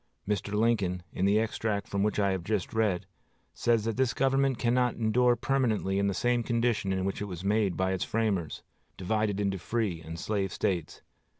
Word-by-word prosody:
Mr. 105 -1 -1
Lincoln, 105 -5 +1
in 95 - 0
the 100 +2 +4
extract 110 -2 -1
from 100 - -1
which 105 +1 +1
I 100 -2 +2
have 95 0 -4 0.2
read, 105 -6 +1 0.5
says 115 -2 +1
that 115 -1 -2
this 130 -3 +1
government 135 -1 +2
cannot 125 0 +1
endure 120 +2 +3
permanently 115 -6 0
in 100 - +2
the 100 - -1
same 120 0 +1
condition 115 -4 0
in 95 0 -1
which 95 - -3
it - - -1
was 90 -3 -7
made 100 -2 +1
by 95 0 +1
its 95 -2 -1
framers 105 -8 -1 0.3
divided 105 +1 0
into 100 -2 0
free 100 -4 -2
and 80 0 -7
slave 100 -1 -1
States. 85 -5 -2
105 Hz, 185 wpm, -29 LUFS, 95-115 Hz, 0.5 s, the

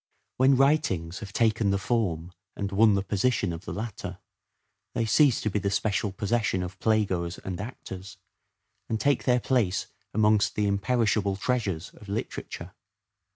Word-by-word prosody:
When 130 +1 +5
writings 110 - +2
have 100 -3 -8
taken 110 -1 +2
the 100 - +2
form 95 -6 -1 0.2
and 100 0 -3
won 105 +1 +5
the 100 - 0
position 100 -2 +1
of 80 +3 -8
the - - -5
latter, 100 -4 -5 0.8
they 115 -1 +1
cease 135 +2 +4
to 110 - 0
be 105 - 0
the 100 - -1
special 105 0 0
possession 100 -1 0
of 90 +1 -7
play 110 -1 +3
goers 85 -2 -3
and 95 0 -5
actors, 95 -5 -8 0.7
and 110 - 0
take 140 +1 +1
their 125 -1 +4
place 110 -7 +1 0.3
amongst 105 -1 +3
the 105 - +1
imperishable 100 0 +1
treasures 100 -6 -1
of 105 - -14
literature. 105 +3 -5
105 Hz, 155 wpm, -27 LUFS, 95-115 Hz, 0.8 s, When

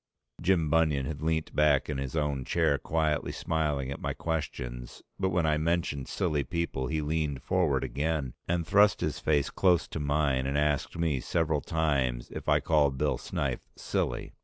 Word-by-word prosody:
Jim 85 -3 +2
Bunion 75 -3 +2
had 75 0 -5
leant 80 0 -1
back 75 -3 +3
in 75 -3 -3
his 65 +1 -4
own 75 -4 0
chair 70 +2 +1
quietly 80 +1 0
smiling 75 -4 -1
at 70 - -6
my - - -2
questions 60 -7 -4 0.2
but 95 -1 +1
when 85 -2 +1
I 75 -1 +2
mentioned 80 -4 -1
silly 75 -2 0
people 85 -5 -2
he 80 +1 -1
leaned 75 -3 -1
forward 80 -8 +1
again, 70 +1 -2
and 85 -1 0
thrust 105 +3 +4
his - - -1
face 75 -3 +1
close 90 -5 +3
to - - -4
mine 70 -3 +1
and 70 +1 0
asked 75 +1 0
me 80 -5 +1
several 80 0 0
times 70 -7 0
if - - -5
I - - +5
called 75 -4 +2
Bill 75 +1 0
Snyth - - -2
silly. - - -2
75 Hz, 175 wpm, -29 LUFS, 70-80 Hz, 0.2 s, I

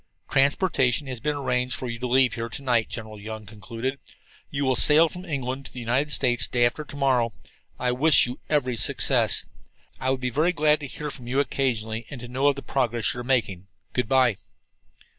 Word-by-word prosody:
"Transportation 140 -1 +2
has 130 -3 -5
been 150 +4 -1
arranged 125 -2 -1
for 130 - -5
you 115 -1 -5
to 125 - -3
leave 130 -1 +3
here 115 -1 -4
to 135 - -7
night," 120 -4 +1
General 110 -1 -7
Young 110 +1 -7
concluded. 115 +7 -5 0.5
"You 140 0 -2
will 130 -1 +2
sail 155 +6 +6
from 180 +3 -9
England 135 -4 -4
for - - -17
the 125 - -7
United 125 +5 0
States 120 -3 +3
day 120 -1 +2
after 120 +6 -1
to 145 - -11
morrow. 130 -4 +2 0.5
I 125 - 0
wish 145 +5 +5
you 125 +1 -6
every 130 -5 0
success. - - +3 0.5
I 130 - -1
would 130 0 0
be 125 -1 -2
very 160 +7 +1
glad 155 -2 +3
to 145 - -6
hear 150 +2 -6
from 125 -3 -11
you 130 +3 0
occasionally, 115 -5 -1
and 140 - -8
to 120 - -8
know 130 +3 0
of 145 - +3
the 140 - -8
progress 120 -5 0
you - - -7
are - - -5
making. 105 -8 -1 0.3
Good 125 -3 -1
by!" 130 -6 +3
130 Hz, 210 wpm, -25 LUFS, 120-140 Hz, 0.5 s, sail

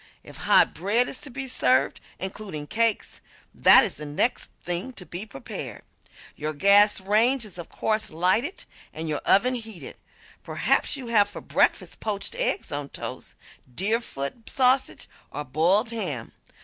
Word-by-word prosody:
If - - -12
hot - - +4
bread 210 +8 +1
is 255 - -3
to 290 - -6
be 270 +1 -4
served 130 - +2 0.2
(including 190 -5 -6
cakes) 225 +5 -1 0.3
that - - +7
is 210 - -3
the 150 - -6
next 150 +12 0
thing 180 +9 -4
to 185 - -6
be 175 +6 -6
prepared. 135 - -7 0.5
Your 155 +1 -4
gas 200 +5 +5
range 225 +6 +2
is 190 -4 -10
of 170 - -8
course 215 0 -1
lighted, 185 - 0 0.3
and 160 +1 -5
your 150 -2 -2
oven 250 +6 +4
heated. 225 -6 -7 0.4
Perhaps - - +1
you 265 - -7
have 205 -3 +4
for - - -8
breakfast - - 0
poached 210 - -3
eggs - - -1
on 145 -1 -4
toast, - - -7 0.4
Deerfoot 215 - -2
sausage 260 0 +2 0.2
or 150 +1 -5
boiled 180 - +2
ham. 155 - -4
205 Hz, 150 wpm, -25 LUFS, 160-230 Hz, 0.5 s, that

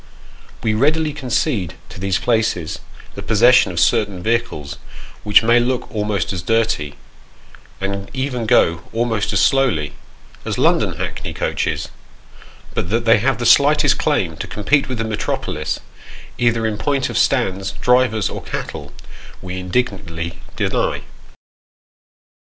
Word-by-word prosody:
We 110 - +1
readily 150 +6 +2
concede 125 - -1
to - - -11
these 95 -1 0
places, 90 -10 0 0.3
the - - -7
possession 120 0 +4
of 85 - -2
certain 100 -2 +1
vehicles, 110 -12 -2 0.4
which 105 +1 +5
may 115 +1 +5
look 125 +1 -1
almost 105 -2 -1
as 90 - -3
dirty, 100 -8 0 0.8
and 100 0 -4
even 130 -4 -2
go 85 -4 +3
almost 115 -2 0
as - - +2
slowly, 120 - +2 0.5
as - - -3
London - - +2
hackney - - -5
coaches: - - -2 0.8
but 85 - -2
that 115 +2 0
they 115 -1 +5
have 130 +4 +1
the 120 - -3
slightest 145 +5 +5
claim - - 0
to - - -5
compete 135 +7 +1
with 125 - -3
the 115 - -1
metropolis, 110 -1 -3 0.6
either 120 -2 +2
in 110 -1 -2
point 140 +3 0
of - - -7
stands, 95 -7 +1
drivers, 125 -4 +2
or - - -5
cattle, 75 -3 -6 0.5
we 95 0 -6
indignantly 90 -5 -3 0.2
deny. - - -1
110 Hz, 135 wpm, -19 LUFS, 95-125 Hz, 0.8 s, which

